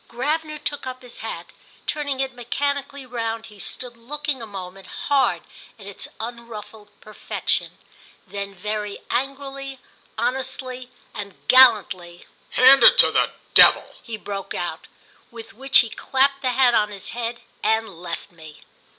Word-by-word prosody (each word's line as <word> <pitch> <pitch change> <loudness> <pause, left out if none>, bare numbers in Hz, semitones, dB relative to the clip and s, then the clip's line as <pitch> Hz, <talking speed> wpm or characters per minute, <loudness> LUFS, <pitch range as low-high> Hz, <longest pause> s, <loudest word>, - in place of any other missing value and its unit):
Gravener 305 +5 -2
took 290 -2 -4
up 255 0 -7
his 245 -1 -6
hat; - - -6 0.3
turning 285 -3 -1
it 265 -1 -2
mechanically 280 +3 -3
round 230 -2 -3
he 210 -2 -14
stood 245 +4 -4
looking 290 +3 -4
a 225 - -6
moment 195 -1 -9
hard 280 -1 +1 0.3
at 205 - -13
its 200 -1 -5
unruffled 225 -2 -8
perfection. 215 - -2 0.5
Then 200 -1 -6
very 210 +1 -4
angrily 275 +1 -3 0.4
honestly 255 0 -2 0.2
and 200 -2 -7
gallantly, 200 -9 +5 0.2
"Hand 265 +2 +7
it - - +9
to - - +7
the - - +2 0.2
devil!" - - +7
he 230 -2 -6
broke 200 -2 -6
out; 175 -2 -4 0.4
with 230 -2 -11
which 270 +4 +5
he 230 - -4
clapped 275 +1 +1
the 255 -2 0
hat 250 -1 +4
on 210 -2 +3
his 200 -2 -7
head 235 0 -4 0.2
and 220 +1 +2
left 175 +2 -6
me. 160 -3 -14
240 Hz, 140 wpm, -23 LUFS, 210-270 Hz, 0.5 s, it